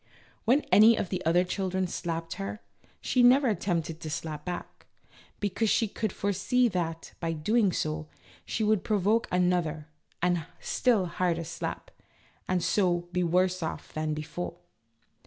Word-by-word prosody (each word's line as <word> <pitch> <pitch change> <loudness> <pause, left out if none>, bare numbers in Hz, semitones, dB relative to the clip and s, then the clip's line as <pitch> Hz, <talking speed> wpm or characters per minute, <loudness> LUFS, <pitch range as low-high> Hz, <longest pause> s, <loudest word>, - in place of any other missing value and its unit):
When 255 +6 +4
any 220 +2 +8
of 180 - -2
the 185 -1 -3
other 175 +2 +4
children 190 0 -1
slapped 165 -2 -4
her, 100 +1 -4 0.4
she 250 - +2
never 255 +3 +6
attempted 170 -6 -1
to 160 - -6
slap 150 0 -4
back, 180 -1 -6 0.5
because 205 +2 0
she 225 - +3
could 215 0 -3
fore 200 +2 -1
see 250 +6 +2
that, 165 -4 -3
by 165 -1 -1
so - - -6
doing, 210 +5 +2 0.7
she 220 - -2
would 215 -2 +2
provoke 215 +3 +2
another 175 -4 +1 0.3
and 175 -2 0
still 230 -7 +2
harder 170 -1 -1
slap, 170 +2 -5 0.6
and 180 -2 +1
so 175 -3 +1
be 180 - 0
worse 180 +2 +2
off 160 - -5
than 155 0 -1
before. 170 +3 -5
180 Hz, 150 wpm, -28 LUFS, 165-210 Hz, 0.7 s, any